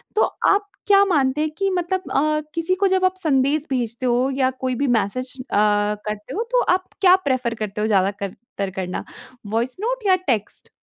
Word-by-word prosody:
तो 435 - +3 0.3
आप 405 0 +2 0.2
क्या 400 -1 +6
मानते 295 -5 +1
हैं 310 - 0
कि 390 0 +1
मतलब 370 +1 -2
अ, 305 +2 +1
किसी 335 +3 0
को 390 +1 +2
जब 375 0 +2
आप 370 - +2
संदेश 285 +1 +2
भेजते 245 -1 -2
हो 245 +2 +2
या 260 -1 +2
कोई 255 -1 0
भी 280 +3 0
मैसेज 255 +6 -4
अ, - - 0 0.5
करते 210 0 -5
हो 450 - 0
तो - - +4
आप 370 0 -4 0.2
क्या 370 -1 +7
प्रेफ़र 250 -3 0
करते 210 -1 -4
हो 215 - +1
ज़्यादा 195 -2 +3
कर 200 -1 -6 0.2
तर 200 -1 -1
करना, 185 -1 -4 0.4
वॉइस 230 +4 -1
नोट 485 +1 -2
या 375 - +6
टेक्स्ट? 225 -6 -2
270 Hz, 200 wpm, -22 LUFS, 230-370 Hz, 0.5 s, क्या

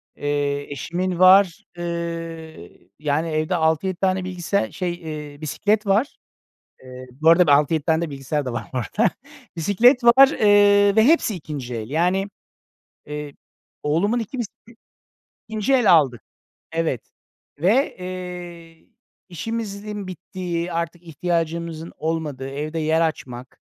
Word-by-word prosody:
Eee, 145 0 -2
eşimin 175 +6 -3
var. 185 -1 +6
Iıı, 165 - -6
yani, 150 +2 -1
evde 155 +3 0
6-7 160 +3 +1
tane 190 0 0
bilgisayar 180 +1 -2
şey, 175 -2 -4 0.3
ııı, 145 - -17
bisiklet 210 +8 0
var. 215 +9 +1 0.7
Eee, 130 0 -10
bu 155 +5 0
arada 175 +1 +6
da 145 - +5
6-7 150 +1 +2
tane 160 0 +1
de 160 - -6
bilgisayar 140 +1 -3
da 125 - -4
var. 120 - -4 0.9
Bisiklet 235 - +4
var, 265 +3 +8
ııı, 205 -2 +4
ve 220 - +6
hepsi 285 -7 +3
ikinci 145 -7 -6
el. 110 +1 -5
Yani, 180 +5 +1 0.8
eee, 150 -1 -6 0.5
oğlumun 185 +11 +1
2 235 +3 -5
bisiklet 230 0 -7 0.8
ikinci 220 +3 -1
el 240 -8 +5
aldık. 135 -8 +3 0.5
Evet. 160 -7 -2 0.5
Ve, 220 - +2
eee, 180 -2 -8 0.4
işimizin 205 +1 -5
bittiği, 180 -1 -5
artık 170 +1 -3
ihtiyacımızın 165 0 -3
olmadığı, 155 -5 -3
evde 150 +4 -4
yer 160 +1 +1
açmak, 130 -6 -4
170 Hz, 125 wpm, -22 LUFS, 155-195 Hz, 0.9 s, var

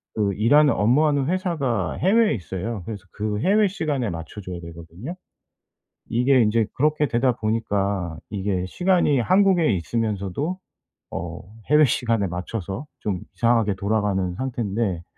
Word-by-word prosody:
그 100 -2 +1
일하는 140 +9 +4
업무하는 140 +5 +2
회사가 155 - -1
해외에 215 +4 +3
있어요. 95 +2 -4
그래서 105 -3 -7
그 105 0 -3
해외 205 - +4
시간에 150 - -2
맞춰 85 +5 -7
줘야 90 -2 -6
되거든요. 85 - -9 1.0
이게 125 +1 +4
인제 110 0 +2
그렇게 150 +1 +2
되다 125 +2 +2
보니까 100 -6 -1
이게 95 -3 -1
시간이 175 - +2
한국에 185 - +3
있으면서도 110 - -2 0.5
어 85 0 -5 0.3
해외 150 0 +7
시간에 115 -6 0
맞춰서 95 - -5 0.2
좀 95 -4 -2
이상하게 115 -4 +2
돌아가는 100 -3 0
상태인데 110 -7 -2
115 Hz, 320 characters per minute, -23 LUFS, 95-145 Hz, 1.0 s, 해외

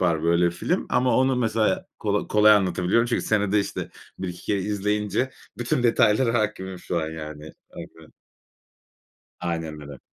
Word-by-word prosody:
var 85 -4 +1
böyle 85 +1 +3
film 85 - -2
ama 125 0 +2
onu 130 0 +3
mesela 120 +11 0
kola 105 -1 -1
kolay 105 0 +6
anlatabiliyorum 95 +3 +2
çünkü 120 - -1
senede 105 -1 +2
işte 100 - -5 0.3
1-2 90 -2 -6
kere 100 - 0
izleyince 105 +4 -1 0.3
bütün 120 +1 0
detaylara 115 0 +3
hâkimim 95 -3 -3
şu 90 -1 -2
an, 80 - -3
yani. 75 -1 -8 0.2
Aynen. - - -12 1.3
Aynen 80 -3 -4
öyle. 70 -2 -10
100 Hz, 140 wpm, -24 LUFS, 85-110 Hz, 1.3 s, kolay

